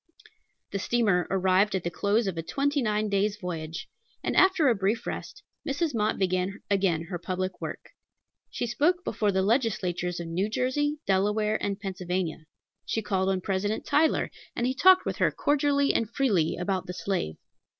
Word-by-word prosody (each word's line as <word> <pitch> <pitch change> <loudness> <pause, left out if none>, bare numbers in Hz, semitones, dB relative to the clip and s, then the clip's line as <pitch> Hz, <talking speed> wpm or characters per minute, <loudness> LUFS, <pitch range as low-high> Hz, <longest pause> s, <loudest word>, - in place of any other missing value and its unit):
The 200 - -2
steamer 205 -5 +1
arrived 190 +2 +2
at 185 - -1
the 170 - -2
close 205 +6 +1
of 190 -3 -2
a 165 - -2
twenty 285 - 0
nine 215 -2 0
days' 200 +1 +1
voyage, 165 -4 -5 0.4
and, - - -1
after 375 -5 +5
a 250 - +5
brief 210 +3 -1
rest, 420 -1 -6 0.2
Mrs. 290 +2 -1
Mott 215 -1 0
began 185 +2 -1
again 190 -5 +2
her 175 +1 -5
public 185 +2 -3
work. - - -6 0.6
She - - -3
spoke 330 +10 +1
before 210 - 0
the 190 0 +1
legislatures 185 -6 0
of 170 - -5
New 185 +5 -1
Jersey, 290 +6 0
Delaware, 210 +3 +1
and 200 0 -2
Pennsylvania. 180 -4 -3 0.4
She 225 - -2
called 190 -1 0
on 190 -1 0
President 200 +3 -1
Tyler, 310 +2 +2 0.2
and 240 - 0
he 255 - +1
talked 370 +7 +6
with - - -2
her - - +3
cordially 285 -1 +2
and 225 - 0
freely 210 - +1
about 185 +1 -2
the 180 - -4
slave. 180 - -2
200 Hz, 170 wpm, -27 LUFS, 185-240 Hz, 0.6 s, talked